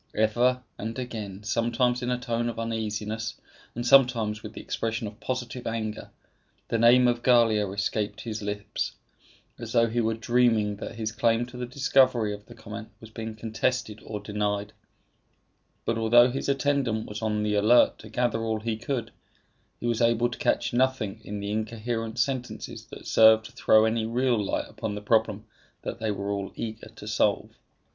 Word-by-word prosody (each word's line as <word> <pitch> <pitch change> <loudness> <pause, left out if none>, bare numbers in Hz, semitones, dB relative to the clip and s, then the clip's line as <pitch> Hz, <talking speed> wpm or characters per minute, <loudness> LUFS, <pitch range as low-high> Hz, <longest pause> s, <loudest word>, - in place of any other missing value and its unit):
Ever 120 +4 +2 0.2
and 115 +3 -4
again, 105 -6 -6
sometimes 120 +3 +1
in 125 - -2
a 125 - +1
tone 120 -1 -1
of 115 - -6
uneasiness, 110 -1 -3 0.4
and 120 +1 -3
sometimes 120 -5 +4
with - - -8
the - - -8
expression 115 0 -3
of 105 +2 -8
positive 125 -1 -4
anger, 110 -2 -4 0.6
the 115 - +1
name 120 +2 +6
of 120 -1 +1
Gallia 115 -5 +4
escaped 105 +1 -2
his 110 -2 -5
lips, 105 0 -3 0.7
as 115 -2 -6
though 115 -1 +5
he 115 +1 0
were 110 0 0
dreaming 115 -3 +2
that 110 - -7
his 110 -1 -3
claim 115 +1 +2
to 125 +1 -13
the 125 0 -4
discovery 130 -4 +3
of 105 0 -10
the - - -12
comet 110 +1 -8
was 110 -1 -13
being 110 0 -6
contested 110 0 -2
or 105 -1 -5
denied; 105 0 -2 1.1
but 115 0 0
although 120 +2 +6
his 135 +2 -3
attendant 135 -5 +1
was 105 +1 -7
on 105 -1 0
the 105 0 0
alert 110 +4 +4
to 110 - -11
gather 120 0 0
all 110 -1 -1
he 110 -1 -2
could, 115 0 -3 0.7
he - - -6
was 120 -1 0
able 115 +1 +3
to 120 - -8
catch - - +1
nothing 120 -5 0
in 105 -1 -5
the 100 0 -3
incoherent 110 +1 -3
sentences 130 -3 -3
that - - -11
served 110 0 +6
to 120 - -10
throw 110 -3 +4
any 110 0 0
real 120 -2 +1
light - - -1
upon 105 - -5
the - - -4
problem 110 -1 +1 0.4
that - - -5
they 110 -1 -1
were 100 0 -2
all 100 -1 -3
eager 110 -1 -6
to 105 -1 -12
solve. 105 -1 +1
115 Hz, 180 wpm, -27 LUFS, 105-120 Hz, 1.1 s, name